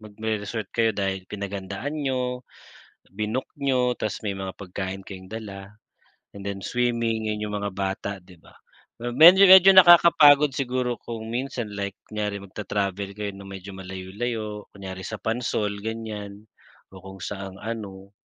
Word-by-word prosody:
magre-resort 110 0 -4
kayo 115 -2 +1
dahil 95 -2 -2
pinaghandaan 100 +6 -5
niyo, 130 -4 -2 0.7
binook 110 +6 -3
niyo, 130 -3 +1
tapos, 110 - -3
may 100 - -2
mga 95 -1 -5
pagkain 95 0 -5
kayong 95 0 -10
dala 100 -3 -8 0.6
and 100 - -8
then 100 -1 -4
swimming, 115 -1 -1
yun 105 0 -3
yung 105 - -4
mga 100 -1 -3
bata, 95 +1 -3
'di 90 0 -17
ba. - - -18 0.5
Medyo-medyo 185 +10 +8
nakakapagod 165 -5 +8
siguro 125 -2 -2
kung 115 -1 -7
minsan, 120 -3 -3
like 100 -1 -4 0.2
kunyari 105 -2 -3
magta-travel 100 0 -3
kayo 105 -1 -4
ng 100 0 -11
medyo 95 0 -8
malayu-layo, 105 +3 -5
kunyari 95 -1 -7
sa 110 - -4
Pansol, 110 -3 -1
ganyan. 105 -2 -6 0.5
O 95 - -12
kung 95 0 -11
saang 95 -2 -6
ano, 100 -4 -6
105 Hz, 140 wpm, -25 LUFS, 100-120 Hz, 0.7 s, Medyo-medyo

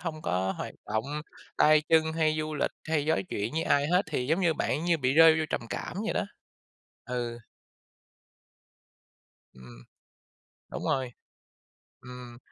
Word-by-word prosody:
hông 160 -2 -5
có 95 +1 0
hoạt - - -6
động 110 +1 -1 0.5
tay 155 0 +5
chân 160 -1 +3
hay 155 -1 +1
du 155 0 -3
lịch - - 0 0.2
hay 155 -2 +1
nói 160 - +2
chuyện 105 +6 -3
với 160 +1 0
ai 145 -2 +2
hết, 180 +4 +3
thì 125 -4 -1
giống 160 +7 +1
như 170 -3 +2
bạn 155 +1 -1
như 170 -2 +2
bị 130 -2 +1
rơi 160 0 +7
vô 160 - 0
trầm - - -1
cảm - - -5
vậy - - -1
đó. - - 0 0.8
Ừ. 120 -1 -4 2.1
Ừm. - - -14 0.9
Đúng - - -5
rồi. 130 -3 -1 0.9
Ừm, 125 -1 -10
150 Hz, 155 wpm, -28 LUFS, 120-160 Hz, 2.1 s, rơi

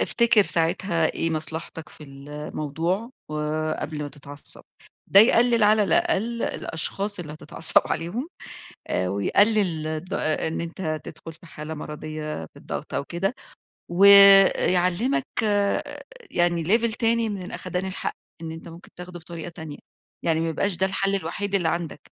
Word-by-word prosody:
افتكِر 235 -3 +4
ساعتها 165 -1 +1
إيه 165 - -1
مصلحتك 160 0 -5
في 150 - -14
الموضوع 150 - -4 0.2
وقبل 155 0 -3
ما 145 - -4
تتعصّب، 145 0 -8 0.4
ده 195 - +7
يقلِّل 235 0 +4
على 210 0 +5
الأقل 230 +5 +1
الأشخاص 195 +5 -3
اللي 150 -3 -7
هتتعصّب 160 +1 +2
عليهم، 200 - -3 0.6
آآ 90 0 0
ويقلّل 170 - +2
الض 155 +4 -4
آآ، 155 +1 0
إن 160 - -3
أنت 165 -2 -4
تدخُل 165 - -10
في 170 +1 -17
حالة 155 0 -7
مَرَضيّة 150 - -6
في - - -26
الضغط - - -7
أو - - -1
كده، 190 - -2 0.6
و 175 +3 +1 0.5
يعلّمك 185 +10 +1 0.2
آآ، 205 -1 0 0.3
يعني 175 -1 +1
level 225 +3 +2
تاني 230 -1 +1
من 195 -3 -5
الأخَدان 180 +1 -5
الحق، 190 - -4 0.3
إن 160 -1 -6
أنت 165 +1 -9
ممكن 165 +2 -13
تاخده 180 0 -9
بطريقة 165 0 -8
تانية، 160 -4 -9 0.5
يعني 160 -1 +1
ما 165 - -1
يبقاش 195 +4 -1
ده 190 - +2
الحَل 195 +1 0
الوحيد 200 +3 -3
اللي 175 -4 +1
عندك، 165 -4 -4
170 Hz, 145 wpm, -24 LUFS, 155-200 Hz, 0.6 s, ده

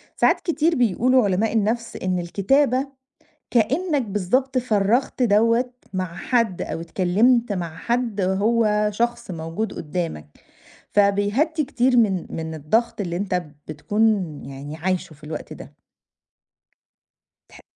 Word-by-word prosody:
ساعات - - +3
كتير 330 -1 +1
بيقولوا 250 +1 +3
علماء 205 +2 +1
النفس 225 +2 0
إن 185 -1 -1
الكتابة 255 +10 +1 0.6
كإنك 280 - +1
بالضبط 235 +5 0
فرّغت 235 +2 +1
دوّة 230 +3 +3 0.2
مع 185 -2 -3
حد 230 -3 0
أو 165 - -4
اتكلّمت 205 +7 +2
مع 170 -4 -4
حد 235 +2 -1
هو 210 +2 +2
شخص 235 0 -2
موجود 165 +6 -4
قُدّامك. 160 - -4 0.6
فبيهدّي 205 +11 +2
كتير 255 -1 +1
من 200 -7 +2
من 160 0 -5
الضغط 220 +11 0
اللي 175 -3 -2
أنت 180 -1 -1 0.3
بتكُون 205 +9 -1 0.4
يعني 140 +3 -8
عايشه 180 -1 -2
في 150 +1 -17
الوقت 155 0 -6
ده. - - -11 1.7
تح - - -16
210 Hz, 120 wpm, -22 LUFS, 180-240 Hz, 1.7 s, ساعات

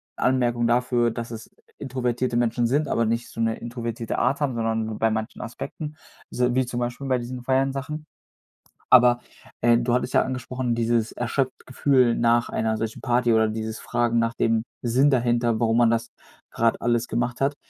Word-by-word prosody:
Anmerkungen 120 -2 +1
dafür, 120 -1 +2
dass 115 0 -6
es 115 -1 -8 0.3
introvertierte 125 -2 -2
Menschen 120 0 +1
sind, 145 +4 +1
aber 115 - +1
nicht 115 +2 -1
so - - -10
'ne 115 0 0
introvertierte 120 -1 -4
Art 140 +2 +1
haben, 130 -4 0
sondern 115 -1 -1
nur 110 -1 -5
bei 110 0 +2
manchen 110 +1 -4
Aspekten, 150 +6 -6 0.3
so 125 0 0
wie 130 -1 +2
zum 120 0 -4
Beispiel 120 +3 -3
bei 130 -1 +2
diesen 125 +1 -6
Feiern-Sachen. 135 +4 -1 0.8
Aber, 120 -1 +6 0.4
äh, 120 0 +5
du 120 0 0
hattest 125 +1 0
ja - - +5
angesprochen, 125 -1 -2
dieses 115 -1 +1
erschöpft-Gefühl 130 0 +1
nach 120 0 +2
einer 110 -1 -1
solchen 115 0 -4
Party 120 -2 +2
oder 110 0 +4
dieses 110 0 -4
Fragen 120 -1 0
nach 115 0 0
dem 115 -1 +1 0.2
Sinn 130 +5 +3
dahinter, 120 -3 +1
warum 115 0 +2
man 120 -1 +5
das 115 0 -1 0.4
grad 115 0 +1
alles 120 0 +1
gemacht 120 +2 -2
hat. 140 +1 +1
120 Hz, 175 wpm, -24 LUFS, 115-125 Hz, 0.8 s, Aber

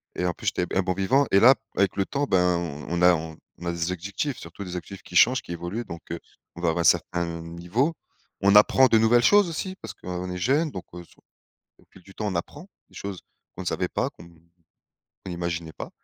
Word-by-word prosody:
Et 90 - -1
en 90 - 0
plus - - -9
j'étais 90 - +1
b - - -9
un 95 - +4
bon 90 0 -1
vivant 120 +10 +2
et 95 - +6
là 125 +5 +8
b - - -16 0.2
avec 100 -2 +2
le 100 - 0
temps, 145 +6 -1
ben, 90 -6 +2
on 85 0 -4
on - - -2
a 90 0 +7
on 80 +1 -9
a 85 - 0
des 85 +1 -2
objectifs, 100 - -3
surtout 85 +4 -9
des 90 -2 -7
objectifs 95 +2 -8
qui 90 - -12
changent, 125 +8 +5
qui - - -11
évoluent 85 +7 -4
donc 85 0 -8
heu, 85 - -3 0.4
on 85 - -8
va 85 - +2
avoir 85 +1 0
un - - 0
certain 85 +2 +2 0.2
niveau. 90 - -1 0.5
On 100 +1 +4
apprend 130 +5 +7
de 115 - +4
nouvelles 120 +2 +4
choses 205 +2 +5
aussi, 185 +3 -4
parce - - -7
qu'on 90 0 -5
est 90 - -4
jeune 145 - +1
donc 95 - -7
heu, 90 - -8
se - - -22 0.6
au - - -24
fil 95 - -17
du 95 +1 -16
temps, 110 - -4
on 100 - -2
apprend 145 - -5 0.2
des - - -24
choses 100 -2 -6 0.3
qu'on - - -6
ne - - -10
savait - - -1
pas, - - -1
qu'on 85 - -15
qu'on 85 0 -26 0.7
imaginait 85 -2 -4
pas - - -7
90 Hz, 245 wpm, -25 LUFS, 85-110 Hz, 0.7 s, là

